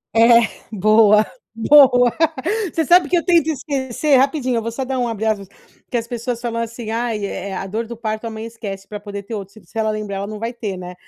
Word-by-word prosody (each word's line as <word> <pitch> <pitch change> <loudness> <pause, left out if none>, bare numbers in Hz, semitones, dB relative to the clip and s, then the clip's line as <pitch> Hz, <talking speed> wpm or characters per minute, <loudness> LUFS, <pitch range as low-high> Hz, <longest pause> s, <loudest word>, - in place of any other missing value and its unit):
É, 230 0 +6 0.3
boa, 215 +1 +5 0.3
boa. 250 0 +6 0.6
Você 325 -2 0
sabe 345 -2 +5
que 355 - +3
eu 335 - -1
tento 340 -4 +4
esquecer 280 -1 0
rapidinho, 260 -2 +2
eu - - 0
vou 230 +1 -4
só 260 +3 -4
dar 260 0 -2
um 245 - 0
abre 220 -1 -3
aspas, 210 -3 -1 0.4
porque 245 - -2
as 230 0 -3
pessoas 240 0 -4
falam 235 -1 -3
assim: 230 -1 -5
"Ai, 225 -3 -2
eh, 200 0 -5
a 195 - -4
dor 220 +4 -4
do 235 - -8
parto, 220 0 -4
a - - -3
mãe 220 0 -7
esquece 200 -4 -7
pra 210 - -7
poder 205 -1 -7
ter 225 - -8
outro, 200 -2 -6
se 215 -5 -16
se - - -26
ela 220 - +1
lembrar 210 -2 -3
ela 200 - -4
não 215 0 -6
vai 230 +3 -4
ter, 205 -5 -5
né." 180 0 -8
230 Hz, 240 wpm, -20 LUFS, 210-245 Hz, 0.6 s, É